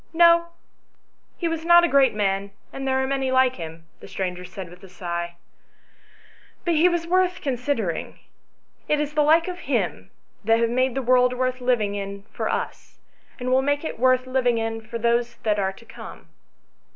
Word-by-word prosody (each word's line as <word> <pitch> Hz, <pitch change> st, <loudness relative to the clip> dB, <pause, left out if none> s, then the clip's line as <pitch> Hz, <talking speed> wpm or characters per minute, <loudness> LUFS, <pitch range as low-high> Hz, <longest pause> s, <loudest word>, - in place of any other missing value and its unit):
" -, -, -40 dB
No, 340 Hz, 0 st, +6 dB, 0.9 s
he 345 Hz, -, -1 dB
was 330 Hz, -1 st, -3 dB
not 345 Hz, +1 st, +7 dB
a -, -, +4 dB
great 275 Hz, -6 st, +4 dB
man, 200 Hz, -1 st, 0 dB, 0.2 s
and 270 Hz, 0 st, -5 dB
there 265 Hz, 0 st, +1 dB
are -, -, 0 dB
many 270 Hz, -1 st, -1 dB
like 260 Hz, 0 st, +3 dB
him," 165 Hz, -1 st, -8 dB
the -, -, -12 dB
stranger 180 Hz, -1 st, -4 dB
said 185 Hz, 0 st, -8 dB
with 180 Hz, +2 st, -15 dB
a 190 Hz, -, -12 dB
sigh. 170 Hz, -1 st, -5 dB, 0.6 s
" -, -, -29 dB
But 345 Hz, -, +2 dB
he 330 Hz, +3 st, +5 dB
was 345 Hz, -1 st, -1 dB
worth 365 Hz, +1 st, +1 dB
considering; 250 Hz, -, -2 dB, 0.7 s
it 300 Hz, -, +2 dB
is 300 Hz, 0 st, -2 dB
the 300 Hz, -, +2 dB
like 320 Hz, +3 st, +4 dB
of 360 Hz, -1 st, -5 dB
him -, -, -2 dB, 0.3 s
that 225 Hz, +2 st, +3 dB
have 230 Hz, 0 st, +1 dB
made 255 Hz, +1 st, +1 dB
the 270 Hz, -, -1 dB
world 250 Hz, 0 st, +4 dB
worth 255 Hz, 0 st, -1 dB
living 235 Hz, -5 st, +1 dB
in 200 Hz, 0 st, -5 dB
for -, -, -2 dB
us, -, -, -4 dB, 0.4 s
and 250 Hz, 0 st, -2 dB
will 260 Hz, +1 st, +4 dB
make 285 Hz, +2 st, 0 dB
it 315 Hz, -, -5 dB
worth 255 Hz, 0 st, +3 dB
living 255 Hz, -2 st, +1 dB
in 225 Hz, 0 st, -2 dB
for 230 Hz, +1 st, -6 dB
those 235 Hz, +1 st, +1 dB
that 210 Hz, -2 st, +1 dB
are 190 Hz, -1 st, 0 dB
to 230 Hz, -, -17 dB
come. -, -, -11 dB
255 Hz, 195 wpm, -24 LUFS, 205-290 Hz, 0.9 s, not